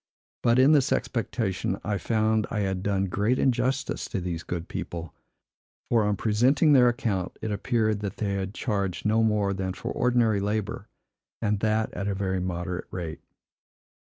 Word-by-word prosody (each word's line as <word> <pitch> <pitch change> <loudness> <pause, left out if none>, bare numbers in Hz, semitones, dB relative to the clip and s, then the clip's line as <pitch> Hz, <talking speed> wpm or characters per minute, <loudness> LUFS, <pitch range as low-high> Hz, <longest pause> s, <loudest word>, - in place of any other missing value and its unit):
But 120 0 +3
in 130 +3 +6
this 145 -2 +4
expectation 100 -4 -1
I 105 -2 -1
found 110 +2 +1
I 105 - -1
had 95 -2 -1
done 95 0 0
great 105 +7 +1
injustice 130 +2 0
to - - -3
these 85 -2 -3
good 85 0 -5
people; 85 -3 -5 0.8
for, 115 -2 +4
on 105 0 +1
presenting 125 - +3
their 125 -3 +7
account, 100 -6 -2
it 110 - -3
appeared 110 0 0
they 100 0 -3
had 95 0 -3
charged 100 -6 -2
no 110 +2 +3
more 105 -3 +2
than 95 -1 -3
for - - -5
ordinary 120 -4 +2
labor, 105 +1 -2 0.5
and 105 -2 0
that 110 +1 0
at 100 - -3
a 100 - -1
very 95 -1 -1
moderate 90 0 -3
rate. 85 -3 -5
105 Hz, 160 wpm, -26 LUFS, 95-115 Hz, 0.8 s, their